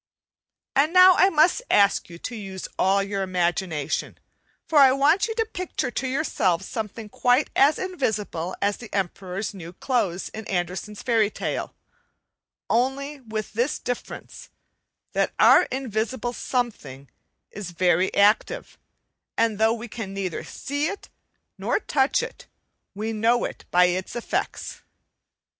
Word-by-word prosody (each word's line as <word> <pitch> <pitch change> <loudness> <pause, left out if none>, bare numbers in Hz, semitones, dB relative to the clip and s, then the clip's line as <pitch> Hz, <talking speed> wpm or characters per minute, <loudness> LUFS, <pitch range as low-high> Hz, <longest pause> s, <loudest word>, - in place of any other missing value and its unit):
And 295 +5 +3
now 365 0 +9
I 380 - +5
must 320 +6 +3
ask 200 -2 +3
you 170 - -10
to 240 +7 -6
use 195 -3 -6
all 195 +1 +3
you 200 0 -3
imagination, 175 -4 -1 0.5
for 310 - +3
I 270 -2 +8
want 300 - +3
you 450 - -4
to 450 -1 +1
picture 365 - -4
to 260 - -2
yourselves 200 - 0
something 220 0 -5
quite 250 +6 +2
as 285 +3 +5
invisible 215 - -2
as 200 0 +1
the 235 - -11
Emperor's 195 +1 -3
new 175 -3 -9
clothes 195 -6 -1
in 220 0 -8
Andersen's 185 +3 -3
fairy 225 -4 +3
tale, - - -4 0.9
only 275 +4 0
with 220 -4 -5
this 240 +7 0
difference, 245 -1 -6 0.6
that - - 0
our - - +7
invisible 240 -1 -2
something 175 - -3 0.4
is 200 -3 -6
very 180 +1 +2
active; 215 - +2 0.6
and 225 -2 +1
though 220 +1 +4
we 235 +1 -7
can 210 -3 -6
neither 190 -3 -3
see 285 +2 -3
it 400 - -6 0.5
nor - - 0
touch 275 -8 +1
it - - -9 0.5
we 220 +2 -3
know 230 +3 +2
it - - -7
by 180 0 +5
its 185 +4 -2
effects. 240 - -3
220 Hz, 140 wpm, -24 LUFS, 190-265 Hz, 0.9 s, now